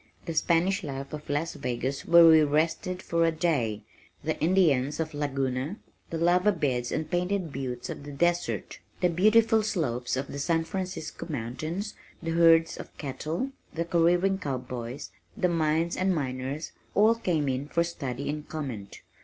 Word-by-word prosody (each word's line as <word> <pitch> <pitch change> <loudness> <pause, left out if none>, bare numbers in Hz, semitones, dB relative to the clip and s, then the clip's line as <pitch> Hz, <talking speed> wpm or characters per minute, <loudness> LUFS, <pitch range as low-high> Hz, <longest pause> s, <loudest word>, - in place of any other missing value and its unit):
The 165 - -3
Spanish 180 +5 +2
life 140 -2 -6
of 150 -1 -7
Las 145 +3 -1
Vegas 125 +2 -3
where 170 0 +8
we 160 -1 +8
rested 160 +5 0
for 170 0 +1
a 165 - +4
day, 140 - 0 0.4
the 155 +2 0
Indians 155 -6 +3
of 155 -1 -2
Laguna, 135 +3 -2 0.3
the 165 - -3
lava 180 +4 +4
beds 130 -9 -1
and 155 -1 -2
painted 180 -2 -1
buttes 125 -3 -4
of - - -6
the 145 - -8
desert, 175 +4 -1 0.2
the 180 - +4
beautiful 220 +5 +4
slopes 130 - -1
of 135 - -1
the 140 - -5
San 165 +3 +1
Francisco 185 -3 -5
Mountains, 155 - -4 0.3
the 165 -1 -3
herds 165 0 +5
of - - -10
cattle, 155 - -3 0.2
the 170 +1 -1
careering 175 +3 +3
cowboys, 125 -3 -5 0.3
the 180 - +2
mines 165 0 +1
and 185 0 +1
miners 135 +1 -3 0.2
all 215 +2 +6
came 175 -10 0
in 135 +2 -1
for 170 +2 +1
study 140 -6 -4
and 150 +1 -4
comment. 125 -11 -6
160 Hz, 160 wpm, -28 LUFS, 135-175 Hz, 0.4 s, where